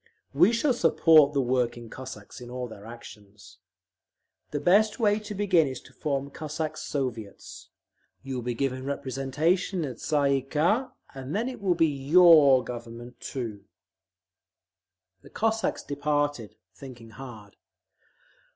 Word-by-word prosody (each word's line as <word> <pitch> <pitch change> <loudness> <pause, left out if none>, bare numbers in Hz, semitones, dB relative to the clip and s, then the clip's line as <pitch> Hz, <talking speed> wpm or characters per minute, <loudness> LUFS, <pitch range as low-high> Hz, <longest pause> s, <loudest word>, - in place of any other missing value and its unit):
We 175 +10 +5
shall 245 +4 +1
support 160 -7 +5
the 140 -2 +1
working 120 -2 -1
Cossacks 125 -3 -10
in 120 - -9
all 125 0 -5
their 110 -2 -12
actions…. 105 -4 -13 0.9
The 145 - -3
best 205 +8 +3
way 210 -2 +2
to 210 -1 -8
begin 185 -6 +3
is 130 -2 -5
to - - -18
form 140 -2 -3
Cossacks 155 0 -5
Soviets; 120 -7 -5 0.5
you 135 -1 -6
will 125 - -3
be 120 0 -3
given 130 +1 -2
representation 140 +7 -1
in 145 - -3
the - - -10
Tsay 140 -1 +1
ee - - -2
kah, 165 - 0 0.2
and 135 +4 -6
then 225 +4 0
it 255 -4 -7
will 185 -3 +1
be 165 - +4
your 145 -2 +6
Government, 120 0 -9
too…." 110 -7 -6 1.6
The - - -16
Cossacks 220 0 -1
departed, 145 -5 -2 0.2
thinking 115 +1 -12
hard. 110 -5 -11
140 Hz, 140 wpm, -27 LUFS, 125-165 Hz, 1.6 s, your